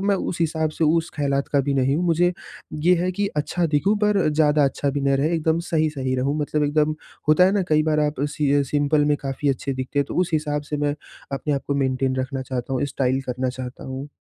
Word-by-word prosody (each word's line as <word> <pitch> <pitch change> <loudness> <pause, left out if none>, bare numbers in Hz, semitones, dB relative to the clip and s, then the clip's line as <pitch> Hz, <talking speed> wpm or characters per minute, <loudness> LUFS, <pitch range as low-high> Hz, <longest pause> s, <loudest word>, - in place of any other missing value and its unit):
मैं 200 - +3
उस 175 - -4
हिसाब 160 -1 0
से, 160 - -1
उस 165 +2 +2
ख़यालात 140 -2 0
का 140 - +4
भी 140 +1 -1
नहीं 135 +2 +2
हूँ। 180 - 0
मुझे, 175 +2 +3 0.4
ये 170 +4 +3
है 185 - +1
कि 205 +2 -1
अच्छा 170 +4 0
दिखूँ 200 +9 +2
पर 205 -5 +3
ज़्यादा 150 -1 +3
अच्छा 140 +1 0
भी 140 +1 -2
नहीं 140 0 +2
रहे, 150 +5 +1
एकदम 160 0 +1
सही-सही 150 -5 0
रहूँ। 140 +4 0
मतलब 150 0 0
एकदम 150 +1 +1 0.3
होता 155 +4 +6
है 190 - +4
ना, 200 -2 +2
कई 155 0 +3
बार 155 -1 +1
आप 145 -2 -4 0.2
सिअ 145 -1 +2
सिंपल 145 +1 +2
में 145 0 +2
काफ़ी 140 +1 -3
अच्छे 135 +1 -1
दिखते 130 +2 -3
हैं। 140 - +2
तो - - -5
उस 180 - 0
हिसाब 150 -1 0
से - - +1
मैं 145 0 0 0.4
अपने 145 +2 -2
आप 140 - -2
को 140 - -1
मेंटेन 130 0 0
रखना 130 +1 -3
चाहता 130 0 -4
हूँ 130 +2 0
स्टाइल 130 0 +1
करना 125 0 -2
चाहता 125 0 -7
हूँ। 135 +2 -6
145 Hz, 235 wpm, -23 LUFS, 135-155 Hz, 0.4 s, होता